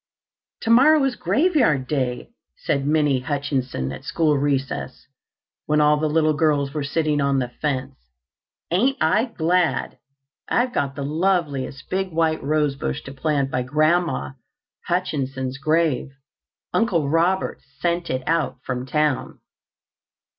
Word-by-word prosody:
"Tomorrow 275 +6 +5
is 270 -2 0
Graveyard 200 - +2
Day," 125 -4 -2 0.3
said 140 0 -1
Minnie 150 -3 +2
Hutchinson 130 - -2
at 125 - -8
school 155 0 +1
recess, 140 -1 -2 0.6
when 150 0 +2
all 150 0 +4
the 155 +1 0
little 155 0 +2
girls 145 -2 +1
were 150 - -2
sitting 150 0 0
on 140 0 +2
the 125 -2 -1
fence. 135 -2 -2 0.7
"Ain't 250 +10 +2
I 205 +9 +3
glad! 180 -6 0 0.5
I've 245 +1 +1
got 140 - -1
the 140 - -4
loveliest 150 -4 -1
big 190 0 -1
white 160 -1 +1
rosebush 140 - -1
to 135 - -8
plant 140 -1 -1
by 125 - 0
Grandma 155 - +1 0.6
Hutchinson's 135 -7 -2
grave. 155 -2 +1 0.6
Uncle 175 -10 +1
Robert 170 +5 +1 0.2
sent 170 0 -1
it 130 0 -2
out 160 -5 0
from 125 0 -4
town." 150 0 0
150 Hz, 125 wpm, -22 LUFS, 135-170 Hz, 0.7 s, Tomorrow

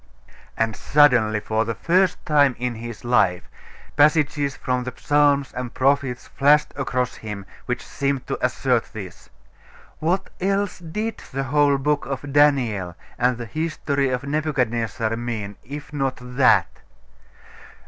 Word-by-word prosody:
And 115 -1 0
suddenly, 125 -8 +4
for 110 +1 0
the 115 0 -3
first 180 +2 +2
time 145 -5 +4
in 125 0 -2
his 115 +1 -8
life, 95 -7 +2 0.5
passages 145 -1 +3
from 125 0 -1
the 125 - -4
psalms 145 -2 +2
and 125 -1 -5
prophets 135 -2 +1
flashed 150 +2 +3
across 125 -2 -2
him, 105 -3 -7 0.2
which - - -3
seemed 140 -2 -2
to - - -4
assert 125 -1 0
this. 95 -5 -9 0.7
What 180 +4 -1
else 195 +1 0
did 210 +7 -4
that 135 +1 -1
whole 145 +1 +3
book 145 -1 0
of 135 +1 -5
Daniel 120 - +2 0.2
and 125 0 +2
the 120 - -6
history 145 0 -1
of 130 +1 -2
Nebuchadnezzar 125 -6 -1
mean 110 -4 -4
if 145 +3 -9
not 135 -2 -1
that? 125 +1 +2
135 Hz, 135 wpm, -22 LUFS, 120-145 Hz, 0.7 s, suddenly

